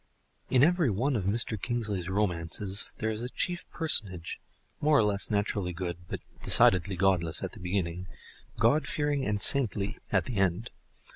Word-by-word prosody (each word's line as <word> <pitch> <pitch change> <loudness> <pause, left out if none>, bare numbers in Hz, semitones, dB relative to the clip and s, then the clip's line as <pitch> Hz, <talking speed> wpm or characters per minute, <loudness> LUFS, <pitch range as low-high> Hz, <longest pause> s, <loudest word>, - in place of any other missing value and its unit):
In 130 0 +4
every 170 -3 +3
one 125 +7 0
of 100 -5 -2
Mr. 110 0 -1
Kingsley's 105 -7 -3
romances 95 0 0
there 110 0 -1
is 110 +1 -4
a 125 - -4
chief 175 +6 -3
personage, 100 - 0 0.4
more 150 0 +3
or 110 - +4
less 100 -1 0
naturally 100 -3 -1
good 85 0 -6
but - - -6 0.2
decidedly 95 +1 +4
godless 90 -3 0
at - - -4
the - - -13
beginning, 90 -1 -3 0.5
god 140 +8 +2
fearing 145 -2 -1
and 105 0 +2
saintly 105 -7 +2
at - - +2
the 120 - -5
end. 95 +4 0
100 Hz, 160 wpm, -28 LUFS, 90-120 Hz, 0.5 s, In